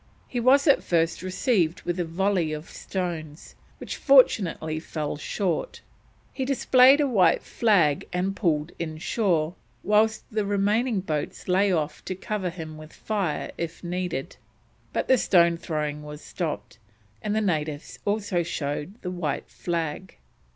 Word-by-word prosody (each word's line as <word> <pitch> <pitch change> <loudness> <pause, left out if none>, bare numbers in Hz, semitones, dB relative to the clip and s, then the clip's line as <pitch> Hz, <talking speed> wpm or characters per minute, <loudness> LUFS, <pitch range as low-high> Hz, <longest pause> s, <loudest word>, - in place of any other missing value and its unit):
He 245 - -3
was 265 +4 +5
at 280 - +5
first 165 -1 +1
received 185 - 0
with 175 +1 -2
a - - +2
volley 175 -1 0
of 155 +2 -7
stones, 165 -5 -5 0.2
which - - -6
fortunately 185 - +4
fell 155 -2 -4
short; 190 - -2 0.5
he 265 - -2
displayed 260 0 +5
a 290 - +3
white 205 -8 +3
flag 185 - +2
and 185 +2 -1
pulled 155 -5 0
inshore, 165 +1 0 0.3
whilst 215 +2 +3
the 215 -1 0
remaining 205 +2 +1
boats 155 -5 -4
lay 190 +2 +3
off 155 -3 -1
to 185 - -3
cover 190 0 -3
him 160 -3 -8
with 155 0 -11
their - - -18
fire 200 -8 -1
if 165 +1 -5
needed, 175 -5 -3 0.5
but - - -1
the 260 -2 +5
stone 170 -4 +4
throwing 150 -3 -3
was 150 0 -9
stopped, 150 - -5 0.4
and 210 - -1
the - - +3
natives 155 -7 -2
also 205 -4 0
showed 160 +4 -4
the 180 - -3
white 170 -6 -3
flag. 170 +1 -4
180 Hz, 145 wpm, -26 LUFS, 155-210 Hz, 0.5 s, was